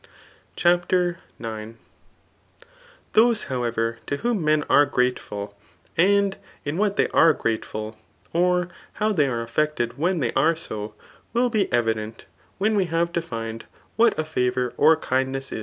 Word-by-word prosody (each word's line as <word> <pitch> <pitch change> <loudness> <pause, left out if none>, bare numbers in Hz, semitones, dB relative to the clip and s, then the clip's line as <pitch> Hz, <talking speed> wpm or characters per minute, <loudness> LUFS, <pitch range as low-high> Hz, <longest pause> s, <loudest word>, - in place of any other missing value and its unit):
CHAPTER 175 0 +2 0.2
IX. 110 -1 -6 1.4
Those^ 225 0 +4
however, 115 -2 -1
to 145 - -1
whom 230 -1 -1
men 155 -1 +2
are 145 0 +5
grateful, 105 -6 -2 0.4
spad 200 +2 +3 0.3
in 145 +3 -2
what 205 -1 +1
they - - +2
are 165 -1 +5
grateful, 110 -3 -3 0.3
or 180 +1 +2 0.2
how 215 0 0
they 150 -7 +3
are 120 -3 -2
affected 120 0 -1
when 175 +2 +1
they 120 -5 -1
are 160 +5 +3
so, 105 -9 -6 0.4
will 245 +1 +2
be 210 -4 +1
evident 110 -2 -1 0.3
when 215 +2 +1
we 195 -2 +2
have 170 +1 -1
defined 115 -9 -4 0.3
what 230 0 +4
a 155 - -1
favour 125 -4 -1
or 155 +2 +5
kindness 135 -1 -2
^. - - -4
150 Hz, 140 wpm, -24 LUFS, 115-180 Hz, 1.4 s, are